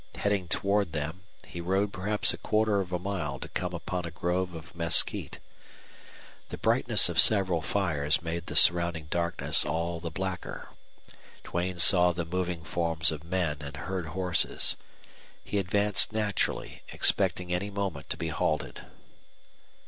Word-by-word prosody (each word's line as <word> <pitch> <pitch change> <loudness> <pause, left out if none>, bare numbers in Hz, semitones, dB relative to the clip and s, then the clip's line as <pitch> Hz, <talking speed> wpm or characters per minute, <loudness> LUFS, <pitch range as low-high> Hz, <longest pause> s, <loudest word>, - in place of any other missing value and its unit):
Heading 100 -3 -1
toward 100 -2 0
them, 80 +4 -4 0.2
he 85 - -8
rode 95 +3 0
perhaps 105 +3 +1
a - - -7
quarter 105 -2 +1
of 90 -2 -7
a 90 - 0
mile 85 -7 -4
to - - -7
come - - -4
upon 90 -1 -4
a 85 - -5
grove 90 +2 -2
of 80 -1 -11
mesquite. 85 -1 +2 1.1
The - - -6
brightness - - +4
of - - 0
several 95 -6 +3
fires 80 -4 +1
made 85 0 -4
the - - -6
surrounding 85 -2 +4
darkness 85 0 +1
all 85 +3 -2
the 85 0 -5
blacker. 95 +2 -5 0.7
Duane 90 +1 -3
saw 90 0 +5
the 85 0 -4
moving 90 -1 -3
forms 80 -1 +1
of 75 -1 -7
men 85 -4 -2
and 70 -1 -8
heard 90 +4 -4
horses. 90 +1 +1 0.7
He 105 - -2
advanced 100 +1 +3
naturally, 105 -2 -2
expecting 90 -1 +2
any 95 +3 -2
moment 100 -8 -4
to - - -3
be - - -4
halted. - - -2
90 Hz, 150 wpm, -28 LUFS, 85-95 Hz, 1.1 s, saw